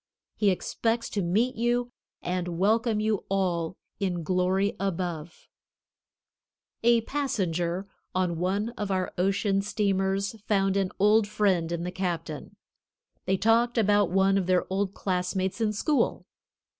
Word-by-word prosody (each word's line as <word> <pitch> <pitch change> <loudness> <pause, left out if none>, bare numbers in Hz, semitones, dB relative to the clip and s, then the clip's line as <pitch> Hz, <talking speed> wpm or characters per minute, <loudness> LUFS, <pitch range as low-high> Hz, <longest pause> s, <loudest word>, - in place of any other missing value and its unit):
He 210 - +3
expects 230 +5 -1
to 205 - -1
meet 215 +9 +1
you 240 +1 0 0.3
and 180 -1 -2
welcome 220 +3 +2
you 215 -1 0
all 180 -4 0 0.2
in 180 -4 -1
glory 185 +3 +1
above. 175 -4 -4 1.3
A 235 0 +4
passenger 190 - -2 0.3
on 180 -3 0
one 195 +5 0
of 210 -4 -5
our 185 -1 -1
ocean 195 +1 +1
steamers 200 0 -1
found 195 -2 +2
an 195 -2 +1
old 210 +1 +4
friend 190 -6 +1
in 170 0 -2
the 180 - -3
captain. 170 -5 -4 0.7
They 190 - +1
talked 230 +3 +3
about 205 -3 +3
one 195 +2 +3
of 185 - -3
their 185 -1 +2
old 195 0 -1
classmates 185 +2 -1
in 215 -1 +2
school. 280 +8 0
195 Hz, 130 wpm, -27 LUFS, 180-215 Hz, 1.3 s, A